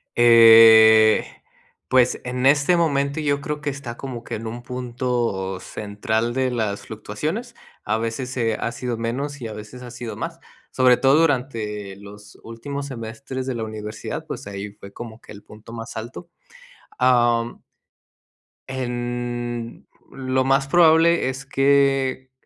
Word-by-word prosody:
Eh, 115 -2 +7 0.6
pues, 125 -1 +3
en 125 +1 -2
este 145 +5 +4
momento 140 -3 0
yo 145 -1 0
creo 150 +1 -4
que 145 - -2
está 130 -4 -6
como 125 -4 -7
que - - -5
en 115 +1 -7
un 120 +2 -6
punto 120 -6 -3
central 110 +3 -3
de 130 -1 0
las 110 -4 -2
fluctuaciones. 150 - -5 0.3
A 110 +1 0
veces, 115 +3 -4
eh, 115 -2 0
ha 115 - -2
sido 120 -1 -4
menos 135 +5 -4
y 115 - -4
a 110 - -7
veces 105 +4 -10
ha 120 - -9
sido 120 -1 -7
más, - - -6 0.3
sobre 125 -1 +4
todo 135 +2 +4
durante 110 -9 -2
los 105 +1 -14
últimos 140 +5 -6
semestres 130 +2 -6
de 130 -2 -3
la 115 - -3
universidad, 110 -1 -6
pues, - - -7
ahí 100 +1 -6
fue 100 -1 -13
como 115 -1 -10
que - - -15
el 105 0 -12
punto 110 +2 -14
más 115 +1 -8
alto. 120 +10 -8 0.7
Am 120 -2 +2 1.1
en 120 -2 -4 0.2
lo 130 0 -1
más 135 +1 +2
probable 165 -2 +4
es 135 +1 -6
que 135 -1 +1
120 Hz, 145 wpm, -22 LUFS, 110-135 Hz, 1.1 s, Eh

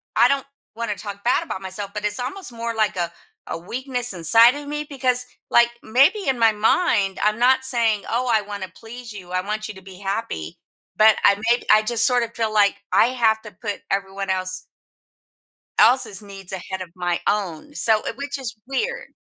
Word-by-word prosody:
I 235 +2 +6
don't 275 -1 0 0.3
wanna 230 -2 -3
talk 200 -1 -8
bad 250 +7 +2
about 195 - -6
myself, 195 +1 -5
but 210 0 -4
it's 210 +2 -2
almost 270 +7 -5
more 230 0 -4
like 215 -2 +1
a 170 -1 -1 0.4
a - - -4
weakness 245 +6 -4
inside 225 - +5
of 290 0 -7
me 295 +1 -3
because, 255 -3 +2 0.3
like, 235 0 +6
maybe 275 - +3
in 265 -2 +1
my 225 -1 +5
mind, 210 - +2
I'm 210 0 +2
not 260 +2 +4
saying, 230 -5 +2
"Oh, 245 +2 0
I 220 -2 +3
wanna 200 -2 -7
please 235 0 -10
you. 185 -3 -10
I 185 0 0
want 215 +1 -3
you 210 - -8
to 190 - -12
be 190 -1 -12
happy," 195 - -4 0.4
but 215 0 +7
I 200 - +6 0.2
make 240 - +1
I 215 0 +6
just 225 +1 +3
sort 245 -1 +3
of 230 0 -6
feel 220 -2 -1
like 205 -2 +4 0.2
I - - +5
have 230 -3 +1
to 210 - -10
put 205 +1 -6
everyone 195 0 -2
else 185 0 -2 1.1
else's 240 -6 +4
needs 195 -2 -9
ahead 190 0 -5
of 180 - -7
my 175 -1 -1
own, 200 - -2
so 220 -6 +3
uh, - - -2
which 280 0 -4
is 240 -5 -3
weird. 445 - -3
220 Hz, 200 wpm, -22 LUFS, 195-245 Hz, 1.1 s, but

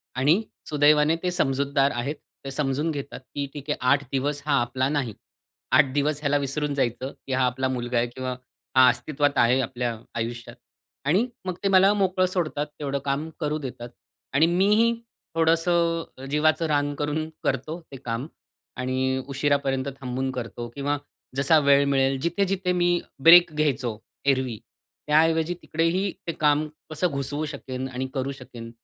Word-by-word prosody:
आणि 150 +11 +3 0.3
सुदैवाने 150 +1 +4
ते 180 - +1
समजूतदार 140 -3 +1
आहेत. 130 +6 -2 0.3
ते 135 - -4
समजून 140 +2 -1
घेतात 140 -3 -6 0.2
की 140 - -1
"ठीक 145 0 -9
आहे, 150 - 0
8 140 +3 +3
दिवस 140 +2 -1
हा 150 - +1
आपला 130 +2 0
नाही, 140 -7 -1 0.6
8 130 - +5
दिवस 145 +1 +1
ह्याला 145 -1 +2
विसरून 145 +1 -2
जायचं, 130 0 -1 0.2
की 135 - -2
हा 130 0 +3
आपला 130 +1 0
मुलगा 120 -1 -2
आहे 120 - +2
किंवा 130 +1 -5 0.5
हा 130 -1 +8
अस्तित्वात 145 +3 0
आहे 125 +3 +4
आपल्या 120 -2 -3 0.2
आयुष्यात" 115 +1 -5 0.5
आणि 190 - +3 0.2
मग 185 -2 -2
ते 195 - +2
मला 195 +1 +6
मोकळं 185 -2 +2
सोडतात, 170 -5 -1
तेवढं 140 -1 -2
काम 145 +4 -1
करू 150 -1 -1
देतात. 125 -4 -7 0.4
आणि 145 +4 +5
मीही 205 +7 +3 0.4
थोडंसं 165 -3 +1
जीवाचं 155 +3 +2
रान 145 -1 +1
करून 150 +2 -2
करतो 160 +3 -2
ते 135 - -7
काम. 115 +4 -3 0.5
आणि 130 +1 0
उशिरापर्यंत 140 -1 0
थांबून 130 0 -2
करतो 120 -1 -5
किंवा 145 +1 -1 0.4
जसा 140 +4 +4
वेळ 140 -1 +5
मिळेल 135 -1 +2
जिथे-जिथे 185 +3 0
मी 175 -1 +2 0.2
ब्रेक 170 0 +9
घ्यायचो 135 -7 0 0.3
एरवी, 130 -4 +1 0.5
त्याऐवजी 160 +2 +3
तिकडेही 170 +5 0 0.2
ते - - +1
काम 150 0 +3 0.2
कसं 155 +3 0
घुसवू 145 0 -2
शकेन 130 -3 -5
आणि 130 +1 -3
करू 135 +1 -2
शकेन, 125 -4 -10
145 Hz, 155 wpm, -25 LUFS, 130-160 Hz, 0.6 s, ब्रेक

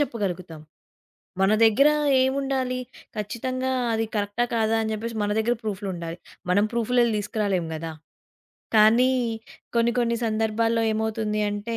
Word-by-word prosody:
చెప్పగలుగుతాం? 185 - -3 0.8
మన 195 +2 +4
దగ్గర 225 +7 +5 0.3
ఏముండాలి? 265 -1 0 0.4
ఖచ్చితంగా 255 +5 -3 0.2
అది 225 0 0
కరెక్టా, 205 +3 0
కాదా 225 0 +2
అని 220 - -2
జెప్పేసి 225 +1 -4
మన 205 - 0
దగ్గర 235 +2 +2
ప్రూఫులు 205 -2 -4
ఉండాలి. 170 -1 -6 0.3
మనం 205 +3 +4
ప్రూఫులెళ్ళి 235 0 +2
తీసుకురాలేము 200 -5 -1
గదా! 160 +1 -5 0.8
కానీ, 230 +4 +6 0.7
కొన్ని 235 0 +3
కొన్ని 235 -1 +1
సందర్భాల్లో 225 +1 +1
ఏమవుతుంది 215 -1 -1
అంటే, 210 +3 -4
220 Hz, 120 wpm, -25 LUFS, 205-235 Hz, 0.8 s, కానీ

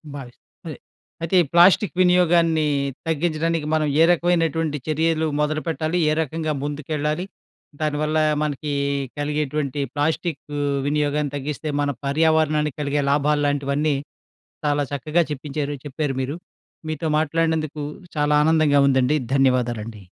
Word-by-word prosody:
భావిస్తా 125 -4 -10 0.2
అదే. - - -6 0.4
అయితే 165 +3 -1
ఈ - - -5
ప్లాస్టిక్ 175 +1 +5
వినియోగాన్ని 170 -3 +3 0.4
తగ్గించడానికి 165 0 0
మనం 155 -1 +2
ఏ - - +8
రకమైనటువంటి 165 -3 +1
చర్యలు 160 +1 +1
మొదలుపెట్టాలి, 155 +2 -1
ఏ - - +2
రకంగా 160 +1 -3
ముందుకెళ్లాలి, 150 +3 -2 0.5
దానివల్ల 155 0 0 0.3
మనకి 150 0 -3 0.5
కలిగేటువంటి 150 -1 -2 0.2
ప్లాస్టిక్ 160 +3 -1 0.4
వినియోగాన్ని 145 0 0
తగ్గిస్తే 145 +2 -4
మన 145 - 0 0.2
పర్యావరణాన్ని 155 0 +2
కలిగే 145 0 0
లాభాల్లాంటివన్నీ 145 0 +1 0.7
చాలా 145 0 +1
చక్కగా 155 +4 0
చెప్పించారు 145 0 -3
చెప్పారు 145 0 -2
మీరు. 140 +5 -3 0.5
మీతో 155 +1 -3
మాట్లాడినందుకు 155 -1 0 0.4
చాలా 150 0 +2
ఆనందంగా 155 -2 +3
ఉందండి. 130 +1 +3 0.2
ధన్యవాదాలండి. 120 -5 0
150 Hz, 105 wpm, -22 LUFS, 145-160 Hz, 0.7 s, ఏ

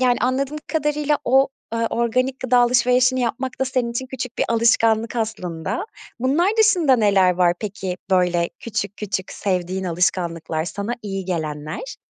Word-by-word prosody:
yani 250 -1 +3
anladığım 270 +4 0
kadarıyla 300 -1 0
o, 265 +2 +4 0.3
ııı, 230 0 0
organik 255 +3 0
gıda 250 -1 +3
alışverişini 250 +1 +3
yapmak 250 +2 -3
da 265 - +3
senin 250 -2 -1
için 250 +2 -3
küçük 250 -2 -6
bir - - +2
alışkanlık 230 0 +2
aslında. 215 - -3 0.3
Bunlar 280 +10 +2
dışında 360 -12 +4
neler 200 -5 +4
var 175 -1 +3
peki 190 -3 -4
böyle 180 -2 +2
küçük 205 -3 -4
küçük 195 -2 -4
sevdiğin 185 -1 -2
alışkanlıklar, 170 -2 -1
sana 200 +6 -4
iyi 195 -2 -4
gelenler? 155 - -4
230 Hz, 145 wpm, -21 LUFS, 185-255 Hz, 0.3 s, o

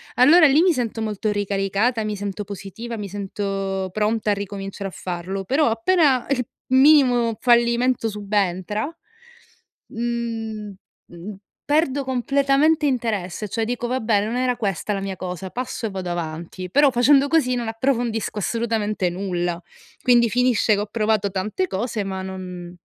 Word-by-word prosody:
allora 315 +6 +7
lì 285 +3 +4
mi 365 -2 +4
sento 235 -5 -3
molto 215 -1 -2
ricaricata, 205 +3 0
mi 215 -1 -2
sento 205 0 -4
positiva, 205 +4 -7
mi 205 -2 -5
sento 195 -1 -3
pronta 215 +2 0
a - - +4
ricominciare 195 0 -5
a - - -16
farlo, 185 +2 -4
però 285 +8 +2
appena 310 -1 +2
il 255 -3 0 0.2
minimo 260 -4 +5
fallimento 240 0 +3
subentra, 205 -1 -1 1.0
mhmm 225 -3 -4 0.3
mhmm, 175 +4 -9 0.3
perdo 290 -2 +1
completamente 275 +4 +2
interesse, 215 -7 -2
cioè 225 +3 -1
dico: 240 +1 -3
"Vabbè, 225 -5 +1
non 225 +3 -3
era 250 -1 +1
questa 205 0 -2
la 195 - -3
mia 195 -1 -4
cosa, 180 +1 -5
passo 250 -1 -4
e - - -7
vado 190 -2 -5
avanti". 170 +2 -5
Però 285 +4 +5
facendo 270 +3 +4
così 275 -6 +2
non 240 -2 -3
approfondisco 225 -1 -1
assolutamente 215 -3 -1
nulla. 175 -2 -3 0.4
Quindi 240 -2 +4
finisce 245 -1 +2
che - - -2
ho - - -2
provato 215 -2 0
tante 210 - -2
cose 220 - -2
ma 190 -1 -4
non 180 -2 -7
220 Hz, 145 wpm, -22 LUFS, 195-250 Hz, 1.0 s, allora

